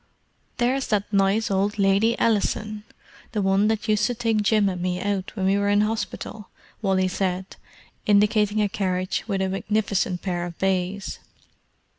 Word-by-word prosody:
"There's 255 +2 +1
that 205 -1 -1
nice 200 +2 +2
old 200 +2 0
Lady 200 +3 +3
Ellison—the 215 0 -2
one 195 +1 +3
that 220 +1 -1
used 210 -1 +2
to 245 - -2
take 225 -2 +1
Jim 210 0 +3
and 180 -2 -2
me 180 0 -1
out 195 0 -2
when 190 -3 -1
we 195 +1 +3
were 200 0 +1
in 205 0 +4
hospital," 210 -1 -3 0.3
Wally 190 -2 +2
said, 185 0 -2 0.5
indicating 210 0 +3
a - - +2
carriage 185 -2 -1
with 195 -3 0
a 190 - 0
magnificent 195 -2 -1
pair 175 -2 -2
of 170 - -10
bays. 190 +1 -1
200 Hz, 155 wpm, -24 LUFS, 190-215 Hz, 0.5 s, in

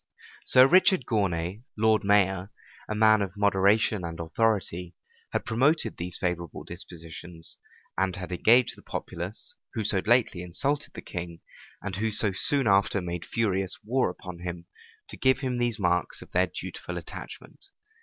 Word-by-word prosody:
[*] - - -22
Sir 130 0 +7
Richard 185 - +5
Gournay, 95 -2 -1 0.2
lord 110 0 +3
mayor, 100 -2 +2 0.4
a 105 - -1
man 110 0 +5
of 95 -1 -4
moderation 100 0 +3
and 85 -1 -5
authority, 90 -1 -1 0.4
had - - -2
promoted 135 +8 +2
these 90 +1 -4
favorable 85 -3 -3
dispositions, 85 -1 -10 0.4
and 95 -2 +1
had 95 0 -6
engaged 115 +7 +4
the - - -15
populace, 90 +6 -6 0.2
who 110 - -1
so 100 -1 +1
lately 115 -6 +3
insulted 140 +12 -2
the - - -7
king, 85 -2 -6 0.4
and 95 -2 -4
who 110 +2 0
so 110 -1 +3
soon 135 +8 +2
after 100 0 +3
made 85 -2 -4
furious 95 -5 -1
war 125 +2 +1
upon 90 -1 -9
him, 85 -1 -6 0.4
to - - -9
give 130 0 +3
him 130 -2 -1
these 120 -2 0
marks 90 -3 0
of - - -19
their - - +3
dutiful - - -6
attachment. - - -9
100 Hz, 155 wpm, -27 LUFS, 90-110 Hz, 0.4 s, Sir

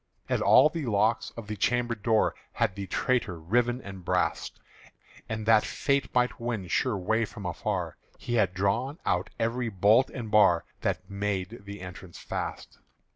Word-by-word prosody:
And - - 0
all - - +7
the 155 -3 -4
locks 110 +1 +1
of 115 - -6
the 105 +1 -5
chamber 120 +3 +1
door 110 0 +2 0.2
Had - - 0
the 100 0 -6
traitor 100 -4 0
riven 120 +9 +1
and 95 -2 -9
brast; 90 +1 -1 0.7
And 110 -1 -3
that 110 -1 +5
Fate 140 -1 0
might 125 0 +2
win 115 -6 -3
sure 120 +2 +1
way 110 +5 +1
from 105 -2 -7
afar, 90 - -3 0.2
He 120 - -5
had 100 -6 +2
drawn 115 - 0
out 90 +4 0
every 115 +1 -1
bolt 105 +6 +4
and 115 -5 -6
bar 105 -6 +5
That - - -2
made 100 +1 -3
the 100 0 -8
entrance 90 -1 -9
fast. - - -6
105 Hz, 165 wpm, -28 LUFS, 95-120 Hz, 0.7 s, all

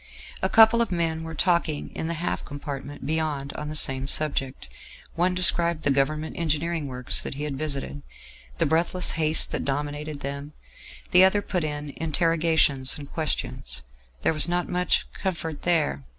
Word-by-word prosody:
A - - +1
couple 225 +1 +6
of 230 - -1
men 165 -2 -1
were 160 0 -7
talking 170 -3 0
in 160 - -4
the 170 - -2
half 170 +2 -3
compartment 145 -1 -7
beyond 150 -2 -2
on 150 0 -6
the 155 - -5
same 135 -2 +2
subject; 140 -3 -2 0.5
one 180 +2 +1
described 170 -2 +2
the 145 - +2
Government 150 +3 0
engineering 160 -1 -1
works 125 -1 +1
that - - -5
he 145 - -5
had 150 -2 -3
visited, 145 -1 -4 0.6
the - - +2
breathless 170 +4 +2
haste 155 -1 +2
that - - -2
dominated 145 +1 -3
them; 140 +2 -6 0.6
the 180 +1 +7
other 200 +2 +3
put 180 -3 -2
in 150 -1 -4
interrogations 160 -4 +1
and 145 -1 -10
questions. 65 - -3 0.4
There - - +2
was 155 +1 +7
not 175 0 0
much 180 0 +1
comfort 165 -5 -4
there. 155 - 0
155 Hz, 165 wpm, -25 LUFS, 145-170 Hz, 0.6 s, the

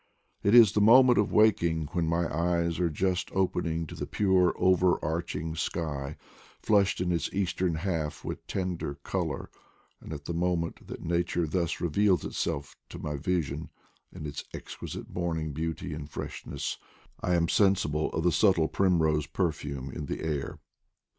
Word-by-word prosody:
It 100 +4 +4
is 115 -5 +9
the 105 - +1
moment 125 +3 +7
of 105 - +1
wakening, 85 -8 +3
when 85 -2 0
my 85 +1 +1
eyes 85 0 0
are 90 -1 +2
just 90 +3 -1
open 95 -2 0
ing 80 0 -1
to - - -10
the - - -5
pute 95 -3 +3
over 90 -1 +4
arching 80 0 -2
sky, 75 -4 -3 0.4
flushed 100 -3 +2
in 90 -1 0
its 85 -2 -1
eastern 95 -3 0
half 80 -3 -3
with - - -6
tender 90 -6 -3
color; - - -3 0.5
and - - -11
at 75 -2 -6
the 85 - -3
moment 85 -1 -1
that - - -8
nature 85 0 0
thus 85 +1 -1
reveals 90 +1 +2
itself 70 0 -3
to - - -8
my 75 -1 -4
vision 75 -1 -2 0.4
in 75 - -8
its 70 - -5
exquisite - - -7
morning 80 -3 -2
beauty 80 +1 -3
and 75 0 -7
freshness, - - -5 0.4
I 90 - +1
am 85 -1 +2
sensible 90 -6 +2
of - - -2
the 90 - +4
subtle 85 -4 +3
primrose 80 -6 +2
perfume 75 -6 -2
in 75 -2 -6
the - - -4
air. 75 -4 -3
85 Hz, 160 wpm, -29 LUFS, 80-95 Hz, 0.5 s, is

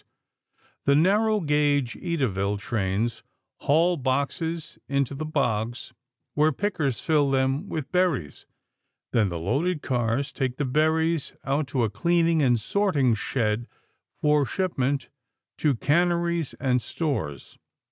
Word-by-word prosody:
The 140 - +4
narrow 210 +6 +3
gauge 145 -5 +1
Edaville 105 - -1
trains 105 +2 -2 0.4
haul 170 +4 +2
boxes 145 +5 -2
into 140 -1 0
the 155 +3 -4
bogs 120 -5 -1 0.4
where 150 +1 +3
pickers 155 - -1
fill 150 -3 +2
them 135 +7 0
with 155 -4 -4
berries. 180 - 0 0.6
Then 110 -4 +2
the 85 - -4
loaded 145 - -1
cars 125 +2 -1
take 130 -2 -2
the 145 - -1
berries 160 +3 +1
out 140 +1 0
to 130 -3 0
a 110 - +1
cleaning 165 - +2
and 120 -4 +3
sorting 145 - +2
shed 110 0 -1 0.5
for 150 -1 +3
shipment 140 -4 -1 0.5
to 145 -4 +2
canneries 170 +3 +1
and 125 -2 +1
stores. 115 - -4
140 Hz, 120 wpm, -25 LUFS, 120-165 Hz, 0.6 s, The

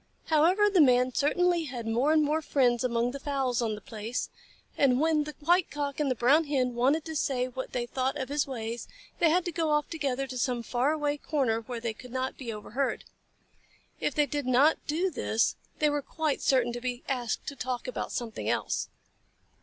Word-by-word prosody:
However, 345 +7 +4
the 390 -4 +4
Man 250 -2 +4
certainly 345 +4 +2
had 245 -5 -6
more 240 +7 +2
and 310 -1 +4
more 305 +2 +1
friends 250 -5 +2
among 240 -1 +1
the 280 - -6
fowls 270 -4 -1
on 220 -2 -1
the 210 - -10
place, 225 +3 -4 0.4
and 260 -3 +3
when 310 -1 +2
the 300 - -7
White 350 +4 +3
Cock 285 -1 -3
and 295 -2 +1
the 255 - +1
Brown 275 +8 +4
Hen 260 -4 0
wanted 270 +6 +2
to 320 -1 -5
say 255 -4 0
what 260 +1 -6
they 240 -1 -2
thought 260 +3 -1
of 260 -3 -3
his 285 0 0
ways, 235 -2 -5 0.3
they 335 - +5
had 350 +2 +2
to 350 - -2
go 330 -1 -1
off 300 -1 +1
together 275 -5 -1
to 255 -2 -6
some 245 -2 0
far 250 +5 +1
away 295 -2 0
corner 260 -7 0
where 235 +1 -6
they 230 -1 -3
could 250 +3 -12
not 260 +1 -2
be 245 -4 -6
overheard. 225 +5 -3 1.0
If - - -1
they 295 -2 +4
did 290 -1 -3
not 270 +5 +4
do 345 +5 0
this, 230 -6 +1 0.2
they 300 -1 +2
were 290 0 0
quite 310 +1 -2
certain 245 -3 +2
to 240 - -5
be 250 0 -4
asked 245 -4 -2
to 285 - -5
talk 250 -1 -4
about 255 - -4
something 230 -3 -3
else. - - -1
270 Hz, 210 wpm, -29 LUFS, 245-300 Hz, 1.0 s, they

